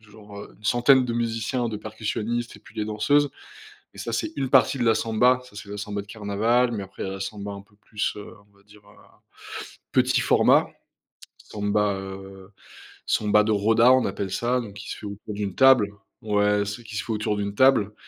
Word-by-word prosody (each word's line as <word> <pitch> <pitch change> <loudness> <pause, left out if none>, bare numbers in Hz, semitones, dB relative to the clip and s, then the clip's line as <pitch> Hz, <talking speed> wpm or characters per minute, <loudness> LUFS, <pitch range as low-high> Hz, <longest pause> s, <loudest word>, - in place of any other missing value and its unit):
genre, 105 -1 -13
heu, - - -12
une 105 - -24
centaine 125 +3 +4
de 120 - -3
musiciens, 115 +1 -1
de 110 - -4
percussionnistes 110 +2 -4
et - - -17
puis - - -18
des 105 - -2
danseuses. 140 +7 +2 0.6
Et - - -16
ça, 115 - -4
c'est 120 - -2
une 135 -2 -1
partie 135 +1 +4
de 120 - +1
la 115 -1 +4
samba, 125 +4 +2
ça 125 - -17
c'est 105 - -9
la 105 - -6
samba 105 0 -4
de 100 - -15
carnaval. 110 +4 +1
Mais 105 -4 -3
après 95 - -8
il - - -3
y - - -3
a - - -5
la 95 - -7
samba 100 0 -5
un 100 0 -8
peu 105 +1 -26
plus, 105 0 -3
heu, 105 - -8 0.2
on - - -31
va 100 - -25
dire, 105 0 -19
heu, 105 - -19 1.0
petit - - +3
format. - - +4 0.7
Samba, 105 0 -1
heu 95 0 -10 0.6
samba 105 0 +3
de 110 - 0
roda, 115 +4 +4
on 130 -2 +3
appelle 95 0 -3
ça, 120 +5 0
donc 105 -4 -10
qui 100 - -9
se - - -6
fait - - -10
autour 100 +1 -8
d'une 100 -2 -4
table. 130 -6 +6 0.3
Ouais, 105 -2 +1
celle 105 +4 -6
qui 110 -1 -9
se - - -2
fait - - -5
autour 105 -1 -1
d'une 100 0 -3
table 125 -5 +4
105 Hz, 220 wpm, -24 LUFS, 100-120 Hz, 1.0 s, table